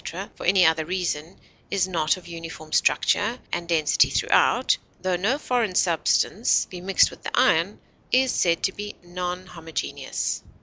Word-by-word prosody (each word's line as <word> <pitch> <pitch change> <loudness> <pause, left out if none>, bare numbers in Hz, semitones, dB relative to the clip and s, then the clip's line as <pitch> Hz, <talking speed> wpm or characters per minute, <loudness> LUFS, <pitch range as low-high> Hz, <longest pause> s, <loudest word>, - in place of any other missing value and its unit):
or 195 +3 -6
for - - -6
any 185 -1 +5
other 160 0 +3
reason 175 -1 -3 0.3
is 190 -2 +1
not 165 -2 0
of 175 -2 -14
uniform 165 -2 -9
structure 205 - +2 0.2
and 170 0 -3
density 155 -3 +3
throughout, - - +3 0.3
tho 185 -1 +1
no 210 +10 0
foreign 240 -9 -1
substance 180 +6 +2
be 180 -1 -7
mixed 190 +1 +3
with - - -14
the - - -5
iron, - - +2 0.3
is 260 +1 +3
said 170 -2 +1
to 190 - +2
be 205 +1 -7
non 180 +1 -5
homogeneous. 165 - -4
180 Hz, 160 wpm, -24 LUFS, 165-195 Hz, 0.3 s, any